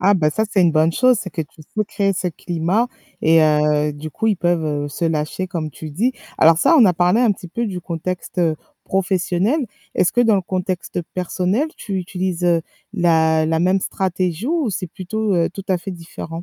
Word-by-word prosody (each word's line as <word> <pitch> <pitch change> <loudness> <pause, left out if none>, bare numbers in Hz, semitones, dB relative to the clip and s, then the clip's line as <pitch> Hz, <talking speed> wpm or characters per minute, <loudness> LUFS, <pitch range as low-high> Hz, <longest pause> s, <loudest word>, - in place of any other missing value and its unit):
Ah, 200 +2 +4
bah, 155 -5 +2
ça, 220 +8 0
c'est 195 - +2
une 170 -2 +4
bonne 155 +1 +3
chose, 255 +4 +4
c'est 185 - -6
que 165 +1 -3
tu 155 +1 -15
sais 215 +7 -3
créer 200 -1 0
ce 180 0 -3
climat 175 +7 -1 0.3
et 160 +1 +5
heu, 150 -1 +2
du 150 +2 -7
coup, 220 - -2
ils 215 -2 +3
peuvent, 175 -2 +1
heu, 145 -1 -2
se 145 +4 -4
lâcher 160 +3 -1
comme 165 -4 -4
tu 155 - -9
le - - -6
dis. 235 - +1 0.3
Alors 160 0 +6
ça, 330 - +5
on 235 - +8
a 185 - +5
parlé 180 +6 +3
un 240 -3 +4
petit 180 -2 -11
peu 235 +7 -2
du 185 -4 -4
contexte, 175 +2 -5
heu, 165 -3 +2 0.3
professionnel. 190 - 0 0.3
Est-ce 180 - +3
que 245 - +2
dans 225 -3 +4
le 195 - +2
contexte 185 -1 -3
personnel, 185 - 0
tu 195 - -4
utilises, 180 -1 -3
heu, 170 -2 +3 0.3
la 160 -4 +3
la 160 0 +1
même 185 +2 +2
stratégie 185 +1 -2
ou 310 -5 0
c'est 185 -1 -4
plutôt, 200 +4 -2
heu, 170 -1 +2
tout 195 +1 -8
à 185 -2 +2
fait 190 +3 -6
différent? 165 -1 -8
180 Hz, 220 wpm, -20 LUFS, 165-195 Hz, 0.3 s, on